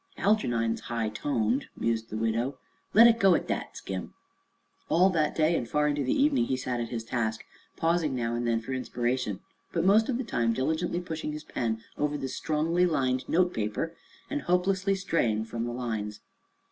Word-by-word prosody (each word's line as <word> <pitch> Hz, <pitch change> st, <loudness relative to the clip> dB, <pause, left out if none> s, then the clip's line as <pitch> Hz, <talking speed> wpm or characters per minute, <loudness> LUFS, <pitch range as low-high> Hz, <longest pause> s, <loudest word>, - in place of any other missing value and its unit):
"Algernon's 120 Hz, -, +1 dB
high 115 Hz, -3 st, -2 dB
toned," 115 Hz, +2 st, 0 dB
mused 115 Hz, -1 st, -1 dB
the 110 Hz, -, -4 dB
widow. 115 Hz, +4 st, 0 dB, 0.4 s
"Let 225 Hz, +2 st, +10 dB
it 235 Hz, -1 st, +6 dB
go 195 Hz, -4 st, +6 dB
at -, -, -2 dB
that, -, -, -3 dB
Skim." 95 Hz, -1 st, -6 dB, 0.7 s
All 185 Hz, +3 st, +5 dB
that 155 Hz, -4 st, +1 dB
day 160 Hz, +1 st, +3 dB
and 120 Hz, -6 st, -2 dB
far 150 Hz, 0 st, +2 dB
into 145 Hz, -1 st, 0 dB
the 130 Hz, -, +1 dB
evening 275 Hz, -3 st, +3 dB
he 130 Hz, -, -1 dB
sat 125 Hz, -1 st, -2 dB
at 115 Hz, -1 st, -3 dB
his 115 Hz, -2 st, -4 dB
task, 110 Hz, -1 st, -2 dB, 0.3 s
pausing 165 Hz, -4 st, +1 dB
now 115 Hz, -2 st, -1 dB
and 120 Hz, 0 st, -1 dB
then 115 Hz, -1 st, +1 dB
for 130 Hz, +4 st, -5 dB
inspiration, 125 Hz, -4 st, -2 dB, 0.3 s
but 170 Hz, 0 st, 0 dB
most 215 Hz, +5 st, +5 dB
of 245 Hz, -, +1 dB
the 260 Hz, -, -2 dB
time 115 Hz, -, 0 dB
diligently 160 Hz, +7 st, -1 dB
pushing 160 Hz, -3 st, -4 dB
his 150 Hz, 0 st, -6 dB
pen 110 Hz, -5 st, -2 dB, 0.2 s
over 150 Hz, 0 st, 0 dB
the 135 Hz, -2 st, -4 dB
strongly 160 Hz, +6 st, +1 dB
lined 130 Hz, -5 st, 0 dB
note 180 Hz, +1 st, +3 dB
paper 110 Hz, +10 st, -2 dB, 0.3 s
and 295 Hz, 0 st, -2 dB
hopelessly 190 Hz, +2 st, +1 dB
straying 120 Hz, -, 0 dB
from 115 Hz, +1 st, -4 dB
the 120 Hz, -, -3 dB
lines. 110 Hz, -4 st, -4 dB
130 Hz, 185 wpm, -28 LUFS, 115-175 Hz, 0.7 s, Let